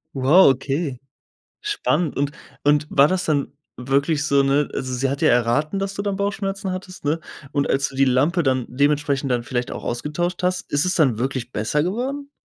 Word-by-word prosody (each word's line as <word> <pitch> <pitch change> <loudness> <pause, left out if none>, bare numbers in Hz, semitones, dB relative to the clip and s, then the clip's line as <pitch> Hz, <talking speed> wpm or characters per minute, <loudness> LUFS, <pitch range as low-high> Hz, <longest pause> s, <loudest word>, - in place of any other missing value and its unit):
Wow, 140 +8 +6
okay. 135 0 -3 0.6
Spannend. 180 - 0
Und 140 +1 0 0.3
und 150 +1 +3
war 140 +1 +5
das 185 -1 0
dann 145 -4 0 0.3
wirklich 140 +4 0
so 140 -2 +3
ne, 140 +1 +2
also 130 -1 -3
sie 130 +2 0
hat 140 +1 -3
ja - - +4
erraten, 125 +9 +1
dass 195 0 -2
du 200 - -3
dann 200 -1 -2
Bauchschmerzen 195 -1 -2
hattest, 185 0 -7
ne? 150 +3 0 0.3
Und 140 -1 0
als 135 0 +1
du 135 - -12
die 135 0 +4
Lampe 145 +8 +2
dann 130 -2 +1
dementsprechend 140 +1 +1
dann 120 -2 0
vielleicht 125 -1 -3
auch - - -6
ausgetauscht 160 +9 -2
hast, 180 0 -1
ist 145 +3 +2
es 185 +1 +1
dann 130 -9 +3
wirklich 130 -1 -3
besser 125 +8 0
geworden? 265 - -3
145 Hz, 195 wpm, -22 LUFS, 135-180 Hz, 0.6 s, Wow